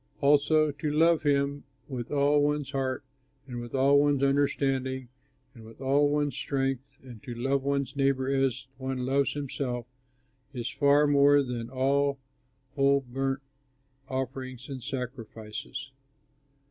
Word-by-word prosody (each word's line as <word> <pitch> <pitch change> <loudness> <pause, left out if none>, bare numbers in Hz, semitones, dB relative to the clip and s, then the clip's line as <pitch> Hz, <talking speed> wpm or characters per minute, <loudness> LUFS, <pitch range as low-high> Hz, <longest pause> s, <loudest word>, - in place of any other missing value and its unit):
Also 150 +1 +4
to 145 +1 -3
love 160 +2 +4
him, 140 -1 +1 0.2
with 125 -4 -5
all 145 0 +3
one's 145 -1 0
heart, 130 -2 -2 0.4
and 120 -3 -6
with 120 +2 -7
all 140 +2 +5
one's 145 -1 +2
understanding, 135 -2 0 0.4
and 115 - -13
with 110 0 -14
all 140 +2 +3
one's 145 -3 0
strength, 135 -1 -2
and 120 -5 -11
to 120 - -7
love 135 +3 0
one's 140 -1 -1
neighbor 135 -1 +1
as 135 -3 0
one 130 -1 -3
loves 135 +1 +1
himself 130 -4 -3 0.7
is 120 -2 -3
far 145 +1 +4
more 145 0 +5
than 120 -2 -4
all 140 +2 +1 0.6
whole 140 0 +3
burnt 135 +1 -3 0.7
offerings 130 -1 -4
and 135 -2 -6
sacrifices.'" 125 +1 -6
135 Hz, 135 wpm, -28 LUFS, 130-140 Hz, 0.7 s, all